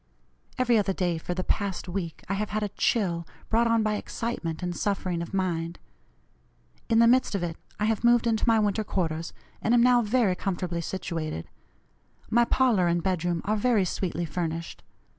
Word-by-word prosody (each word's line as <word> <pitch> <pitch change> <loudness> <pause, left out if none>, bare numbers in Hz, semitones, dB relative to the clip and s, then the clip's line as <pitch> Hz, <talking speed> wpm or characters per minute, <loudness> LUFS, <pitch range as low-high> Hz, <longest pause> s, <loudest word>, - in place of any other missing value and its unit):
Every 245 -3 +3
other 195 -1 0
day, 175 -3 -1
for 175 +2 -4
the 185 - -2
past 200 -2 -2
week, 175 -3 -4
I 195 - -1
have 210 +1 -2
had 215 0 -1
a 205 - -1
chill, 180 -5 0 0.2
brought 230 +1 +3
on 230 -1 +3
by 215 -1 0
excitement 185 -9 -4
and 175 -1 -2
suffering 185 -4 -1
of 170 - -6
mind. 170 -3 -1 1.1
In 225 - +3
the 230 - +7
midst 245 -2 +3
of 190 - -1
it 165 -2 -3 0.2
I 210 - +1
have 220 0 0
moved 240 0 +5
into 225 0 +1
my 225 -1 +5
winter 210 0 +1
quarters, 165 -5 -2 0.3
and 230 +3 +3
am 235 - +5
now 245 -1 +5
very 220 -3 +2
comfortably 180 -2 -2
situated. 165 - -4 0.8
My 235 +1 +5
parlor 230 -9 +3
and 170 0 +1
bedroom 175 -2 0
are 215 - +1
very 215 -2 +2
sweetly 175 -1 -2
furnished. 165 0 -4
195 Hz, 180 wpm, -27 LUFS, 170-225 Hz, 1.1 s, the